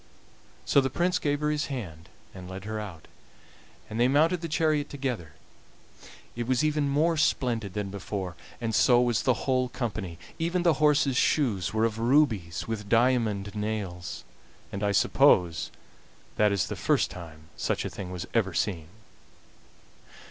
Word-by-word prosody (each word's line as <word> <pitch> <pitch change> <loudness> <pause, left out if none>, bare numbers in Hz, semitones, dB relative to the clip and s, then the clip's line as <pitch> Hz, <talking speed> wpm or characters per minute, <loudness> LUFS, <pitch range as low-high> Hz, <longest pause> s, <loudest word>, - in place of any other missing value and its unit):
So 140 - +4
the 135 - -1
Prince 175 +7 +1
gave 145 -3 -1
her 150 0 +1
his 150 -1 -1
hand 90 - -7 0.2
and 90 -1 -9
led 95 0 -7
her 110 0 -3
out, 95 -7 -8 0.8
and 110 - -5
they 120 - +5
mounted 160 +6 +3
the 165 - -3
chariot 155 -2 +1
together; 125 - -4 1.0
it 120 0 -3
was 130 +2 +2
even 150 -2 +1
more 160 +4 +2
splendid 115 -9 0
than 105 -2 -3
before, 95 -3 -5 0.2
and 115 -2 -2
so 120 +2 +5
was 120 -2 +2
the 130 -3 0
whole 130 -1 +1
company. 105 -9 -4 0.2
Even 170 +2 0
the 160 -4 +2
horses' 145 -3 +3
shoes 110 - +1
were 110 +1 +2
of 110 -1 -2
rubies 115 - +2
with 105 -3 -4
diamond 115 -4 +2
nails, 105 -5 -4 0.5
and 100 - -5
I 105 -1 +1
suppose 85 -3 +3 0.7
that 105 -1 +3
is 100 -2 +1
the - - -5
first - - +1
time 80 -3 -11
such - - -1
a - - 0
thing 95 -2 -7
was 90 -2 -5
ever 95 -7 +1
seen. 85 -7 -1
115 Hz, 160 wpm, -27 LUFS, 95-140 Hz, 1.0 s, they